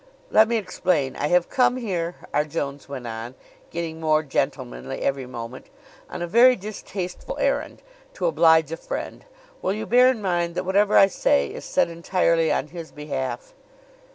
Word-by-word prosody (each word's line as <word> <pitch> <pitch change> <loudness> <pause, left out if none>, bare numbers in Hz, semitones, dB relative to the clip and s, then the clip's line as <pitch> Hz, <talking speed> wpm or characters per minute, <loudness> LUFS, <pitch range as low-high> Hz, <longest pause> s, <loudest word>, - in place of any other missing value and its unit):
"Let 220 +1 +6
me 235 0 +1
explain: 180 -8 -1
I - - -1
have 175 +1 +3
come 250 -1 +2
here," 180 -8 -3 0.2
R. 150 - +3
Jones 140 -2 -5
went 130 -3 -6
on, 115 +2 -6 0.3
getting 165 -1 -5
more 155 -1 +2
gentlemanly 65 - -3
every 135 -2 -1
moment, 120 0 -8 0.4
"on - - -5
a - - -3
very 240 +7 +6
distasteful 195 - -6
errand, - - -1 0.3
to - - -2
oblige 160 - +4
a 165 - -3
friend. - - -6 0.4
Will 190 - 0
you 215 +1 -4
bear 250 +2 +5
in 255 -3 +2
mind 175 -3 -1
that - - -2
whatever 200 +2 +3
I - - +9
say 70 - +1
is - - -8
said - - +2
entirely 170 -1 +1
on 150 - -1
his 170 -2 -8
behalf?" 150 - -5
170 Hz, 170 wpm, -24 LUFS, 140-195 Hz, 0.4 s, I